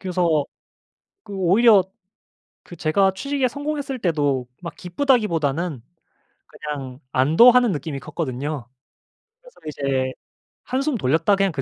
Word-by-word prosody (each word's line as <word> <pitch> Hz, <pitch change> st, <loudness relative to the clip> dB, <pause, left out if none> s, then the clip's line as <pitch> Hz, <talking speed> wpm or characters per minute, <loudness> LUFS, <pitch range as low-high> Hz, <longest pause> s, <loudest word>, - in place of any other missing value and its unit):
그래서 175 Hz, -6 st, +1 dB, 0.8 s
그 205 Hz, -, -10 dB
오히려 195 Hz, +3 st, +5 dB, 0.8 s
그 175 Hz, -, -12 dB
제가 190 Hz, +5 st, +2 dB
취직에 275 Hz, +3 st, -1 dB
성공했을 285 Hz, -1 st, -4 dB
때도 145 Hz, -, 0 dB, 0.2 s
막 170 Hz, -3 st, -7 dB
기쁘다기보다는 175 Hz, -, 0 dB, 0.7 s
그냥 135 Hz, -3 st, -7 dB
안도하는 235 Hz, -, +5 dB
느낌이 145 Hz, -3 st, -4 dB
컸거든요. 140 Hz, -2 st, -4 dB, 0.7 s
그래서 -, -, -19 dB
이제 135 Hz, -3 st, -1 dB, 0.5 s
'한숨 270 Hz, +2 st, -1 dB
돌렸다.' 165 Hz, +7 st, +2 dB
그냥 195 Hz, -1 st, +1 dB
그 140 Hz, -3 st, -4 dB
170 Hz, 275 characters per minute, -22 LUFS, 145-230 Hz, 0.8 s, 오히려